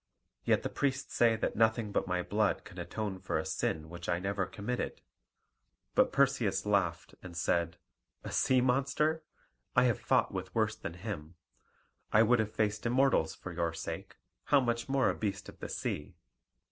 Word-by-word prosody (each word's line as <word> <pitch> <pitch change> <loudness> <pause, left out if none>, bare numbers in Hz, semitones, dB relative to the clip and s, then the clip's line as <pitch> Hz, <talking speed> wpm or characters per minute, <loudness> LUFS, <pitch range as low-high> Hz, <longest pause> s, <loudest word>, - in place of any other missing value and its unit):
Yet - - +3
the - - -1
priests 140 0 -1
say 115 -1 +4
that 110 - -2
nothing 110 -1 +2
but - - 0
my 90 -1 0
blood 105 0 +1
can - - -11
atone 105 -4 -4
for 95 - -1
a 80 - -2
sin 80 0 -1
which 85 +1 -7
I 85 - +2
never 95 +1 -1
committed." 120 +5 -3 0.9
But - - +4
Perseus 125 -9 +2
laughed, 95 -5 0
and 85 -2 -9
said, 85 0 +1 0.5
"A - - -6
sea 130 -1 +3
monster? 140 +5 +1 0.5
I 125 - +6
have 120 -4 +2
fought - - +2
with 95 -1 -5
worse 110 -1 +2
than 85 - -6
him: 90 -4 -6 0.8
I 110 - +6
would 120 +1 +4
have 110 -1 0
faced 105 +1 0
Immortals 125 -9 +3
for 90 - -8
your 85 -1 -1
sake: - - -6 0.3
how 145 - +5
much 120 -1 -1
more 135 0 +3
a - - +2
beast 105 -1 -3
of - - -13
the - - -6
sea?" 75 - -3
105 Hz, 175 wpm, -32 LUFS, 90-125 Hz, 0.9 s, I